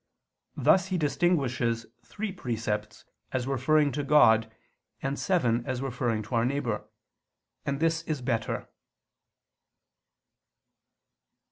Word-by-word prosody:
Thus 190 0 +4
he 185 -1 -1
distinguishes 135 -7 +1 0.2
three 210 - -5
precepts 110 - -3 0.3
as 130 -2 -1
referring 145 +3 +2
to 145 +2 -2
God, 115 -7 +5 0.5
and 135 +1 -2
seven 125 - +1
as 130 0 -2
referring 120 -4 -1
to 105 - -10
our 115 -1 +3
neighbor. 125 -4 -2 0.8
And 140 0 -1
this 165 0 +1
is 155 -3 -2
better. 115 -3 -2
135 Hz, 105 wpm, -28 LUFS, 115-150 Hz, 0.8 s, God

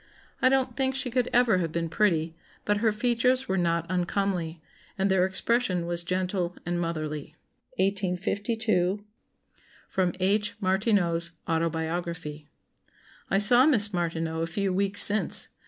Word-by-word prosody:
I 255 - +5
don't 265 -1 0
think 265 -1 0
she 255 -2 -3
could 250 0 0
ever 235 -6 +3
have 165 -3 -2
been 165 +1 -2
pretty, 165 -2 0 0.3
but 205 0 +1
her 220 +1 +2
features 245 +4 +1
were 190 - -1
not 170 -2 0
uncomely, 180 -2 -2 0.4
and 195 0 +1
their 185 -1 +3
expression 190 -2 0
was 170 0 -1
gentle 180 0 -2
and 175 0 -2
motherly." 155 -3 -4 0.4
1852. 195 +1 -1 0.9
[Sidenote: 185 -1 0
H. 205 +3 +1
Martineau's 185 -4 0
Autobiography.] 165 -1 -3 0.4
"... - - -29
I 195 - +2
saw 240 +7 +7
Miss 210 -8 +3
Martineau 165 -2 -2
a 165 - -1
few 195 +2 -2
weeks 200 +1 +4
since. 210 +1 +3
185 Hz, 140 wpm, -26 LUFS, 170-210 Hz, 0.9 s, saw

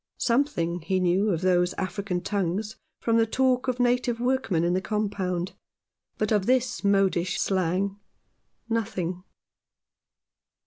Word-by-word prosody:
Something 235 - +1
he 185 +3 0
knew 185 +4 +2
of 170 -4 0
those 180 -1 +2
African 190 -1 -3
tongues 200 +2 -2 0.3
from 230 -1 +2
the 225 0 +3
talk 255 +2 +1
of 250 -1 -1
native 245 -1 +1
workmen 245 -9 +1
in 175 +1 +2
the 185 - +1
Compound, 190 -3 -2 0.6
but 215 0 -1
of 205 -2 +2
this 250 -2 +1
modish 195 -3 +2
slang 190 +2 0 0.7
nothing. 195 -6 -2
200 Hz, 125 wpm, -26 LUFS, 180-230 Hz, 0.7 s, the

